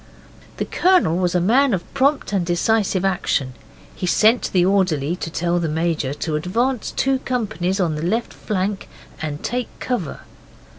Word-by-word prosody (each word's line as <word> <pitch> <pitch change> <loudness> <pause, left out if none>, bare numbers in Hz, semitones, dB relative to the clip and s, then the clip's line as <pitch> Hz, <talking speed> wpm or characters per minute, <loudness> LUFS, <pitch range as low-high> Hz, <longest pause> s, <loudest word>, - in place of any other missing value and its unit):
The - - -1
Colonel 360 - +3
was 180 -1 0
a - - +4
man 240 +6 +3
of 175 - -4
prompt 275 -4 +1
and 190 -3 +2
decisive 190 +2 +1
action. 150 -8 0 0.4
He 180 - -3
sent 220 +6 +3
the 180 -2 +3
orderly 180 -6 +1
to 170 - -4
tell 175 +2 0
the 165 -2 -1
Major 160 -3 -1
to 155 +1 -3
advance 230 +10 -1
two 270 0 0
companies 200 -8 -2
on 170 -4 +1
the 150 - -4
left 220 +8 -1
flank 195 0 -3 0.3
and 150 -1 -4
take 245 +2 -2
cover. 220 - -3
185 Hz, 160 wpm, -21 LUFS, 170-230 Hz, 0.4 s, a